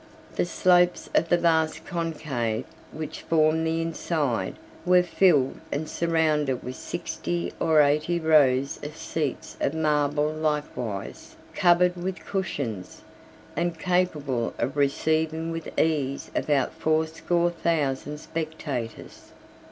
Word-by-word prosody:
The - - +1
slopes 180 0 +3
of 165 - +2
the 175 - +5
vast 160 -2 +1
concave, 145 -10 -2 0.3
which 155 0 -6
formed 160 0 +2
the 165 0 0
inside, 150 - -1 0.3
were 180 0 +5
filled 165 -7 +3
and 155 +2 -2
surrounded 155 -6 +1
with 125 +1 -5
sixty 85 -6 -4
or 160 -2 +5
eighty 155 +4 +1
rows 140 -4 +3
of 150 +2 -7
seats 150 -5 -3
of 140 - 0
marble 150 -1 +1
likewise, 150 -10 -3 0.2
covered 180 0 +4
with 180 +1 -4
cushions, 140 - -4 0.5
and 170 +1 -1
capable 155 -9 0
of 125 +4 -2
receiving 160 +3 +1
with 165 -1 -5
ease 145 -4 0
about 145 -3 +1
fourscore 160 +2 +1
thousand 150 -4 -1
spectators. 155 -8 -5
155 Hz, 115 wpm, -26 LUFS, 140-165 Hz, 0.5 s, the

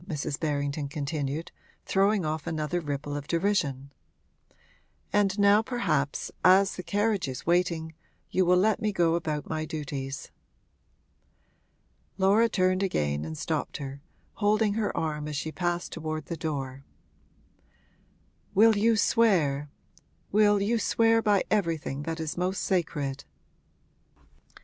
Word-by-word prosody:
Mrs. 150 -4 -3
Berrington 145 -1 -1
continued, 145 +1 -3 0.3
throwing 195 -1 +2
off 155 +1 -3
another 160 +1 -1
ripple 145 -1 -4
of 145 0 -5
derision. 165 -7 0 1.2
'And 205 -1 +2
now 200 +1 +5
perhaps, 225 - -1
as 190 +1 +5
the - - -5
carriage 205 -2 0
is 130 -2 -6
waiting, 170 -2 +1 0.4
you 185 - +3
will 180 0 +4
let 215 +4 +2
me 215 -1 +1
go 170 -4 +2
about 155 -3 -2
my 155 -1 -2
duties.' 140 -4 -5 1.9
Laura 200 +4 +4
turned 185 -1 +1
again 75 - 0
and 80 0 -6
stopped - - -2
her, 140 0 -7 0.4
holding 210 0 +2
her 215 -1 -1
arm 150 -2 -2
as 150 - -4
she 155 +3 -3
passed 175 +1 -2
toward 155 -2 -4
the 170 - -4
door. 140 -4 -4 1.7
'Will 220 +2 +6
you 225 +3 +3
swear 165 -11 +2 0.6
will 205 0 +4
you 230 +3 +1
swear 225 +1 +3
by 205 -3 +3
everything 165 -8 0
that 165 +2 -4
is 160 -1 -3
most 185 +2 -1
sacred?' 145 -7 -1
165 Hz, 125 wpm, -27 LUFS, 145-200 Hz, 1.9 s, Will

